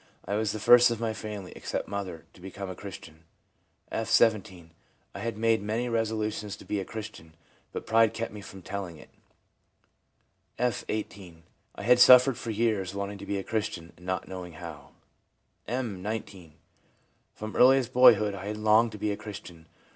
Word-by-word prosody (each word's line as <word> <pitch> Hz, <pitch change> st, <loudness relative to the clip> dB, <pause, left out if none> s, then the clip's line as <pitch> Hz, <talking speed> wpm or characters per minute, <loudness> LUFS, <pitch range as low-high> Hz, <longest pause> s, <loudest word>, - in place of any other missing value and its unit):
I -, -, -3 dB
was 105 Hz, 0 st, 0 dB
the 110 Hz, -, -4 dB
first 120 Hz, +3 st, +7 dB
of 115 Hz, -2 st, -3 dB
my 115 Hz, -1 st, -1 dB
family, 105 Hz, -4 st, -7 dB
except -, -, -4 dB
mother, 95 Hz, -5 st, -5 dB
to 90 Hz, -, -18 dB
become 95 Hz, 0 st, -7 dB
a -, -, -7 dB
Christian/ 85 Hz, -5 st, -10 dB, 0.7 s
F., 115 Hz, -, -2 dB
17. 95 Hz, -7 st, +2 dB, 0.2 s
' -, -, -41 dB
I -, -, -7 dB
had 115 Hz, +1 st, -4 dB
made 115 Hz, -1 st, +2 dB
many 110 Hz, +4 st, -2 dB
resolutions 110 Hz, -2 st, -2 dB
to -, -, -14 dB
be 105 Hz, -, -2 dB
a 95 Hz, -, -4 dB
Christian, 105 Hz, -8 st, -9 dB, 0.4 s
but -, -, -6 dB
pride 115 Hz, -1 st, +4 dB
kept 115 Hz, -1 st, -5 dB
me 105 Hz, -, -8 dB
from 95 Hz, -1 st, -11 dB
telling 95 Hz, -4 st, -5 dB
it/ -, -, -16 dB, 1.5 s
F., 125 Hz, -1 st, 0 dB
18. 95 Hz, -6 st, -6 dB, 0.2 s
' -, -, -36 dB
I -, -, -8 dB
had 125 Hz, +1 st, +5 dB
suffered 125 Hz, 0 st, +8 dB
for 115 Hz, -, -6 dB
years 105 Hz, -4 st, 0 dB
wanting 100 Hz, 0 st, -4 dB
to -, -, -9 dB
be 100 Hz, -, -1 dB
a 95 Hz, -, -3 dB
Christian, 100 Hz, -7 st, -3 dB
and 90 Hz, -, -19 dB
not 95 Hz, 0 st, -2 dB
knowing 90 Hz, -2 st, -7 dB
how/ 80 Hz, -3 st, -10 dB, 0.7 s
M., 115 Hz, -6 st, -3 dB
19. 95 Hz, -6 st, -6 dB, 0.4 s
* -, -, -41 dB
From 110 Hz, 0 st, -7 dB
earliest 130 Hz, -1 st, +5 dB
boyhood 105 Hz, -5 st, +6 dB
I 100 Hz, 0 st, -7 dB
had 105 Hz, +1 st, -4 dB
longed 110 Hz, +1 st, +3 dB
to -, -, -7 dB
be 105 Hz, +1 st, -1 dB
a -, -, -1 dB
Christian. 90 Hz, -6 st, -10 dB
105 Hz, 185 wpm, -28 LUFS, 95-115 Hz, 1.5 s, suffered